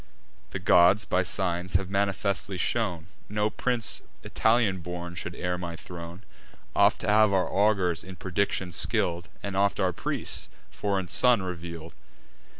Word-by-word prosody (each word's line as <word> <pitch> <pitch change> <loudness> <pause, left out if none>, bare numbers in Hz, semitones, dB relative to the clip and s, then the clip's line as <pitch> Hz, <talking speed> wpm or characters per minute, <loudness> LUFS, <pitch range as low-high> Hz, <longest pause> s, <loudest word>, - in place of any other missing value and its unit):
The - - -4
gods, 90 +4 +5
by 90 - +2
signs, 90 0 -1
have 95 0 +1
manifestly 100 0 -1
shown, 90 -5 -1 0.2
No 105 +1 0
prince 125 -3 -1 0.2
Italian 110 -4 +2
born 85 0 -6
should 85 -1 -5
heir 90 0 -2
my 85 -1 -5
throne: 85 +2 -9 0.5
Oft - - +4
have 105 0 +5
our 95 -2 +2
augurs, 95 -5 +2
in 95 0 -9
prediction 95 0 -1
skill'd, 85 +1 0
And 100 -1 -4
oft 100 +1 +2
our 95 -2 +2
priests, - - -3 0.2
a - - -21
foreign 100 -3 -1
son 115 +5 +4
reveal'd. 85 -3 -6
95 Hz, 145 wpm, -27 LUFS, 85-100 Hz, 0.5 s, gods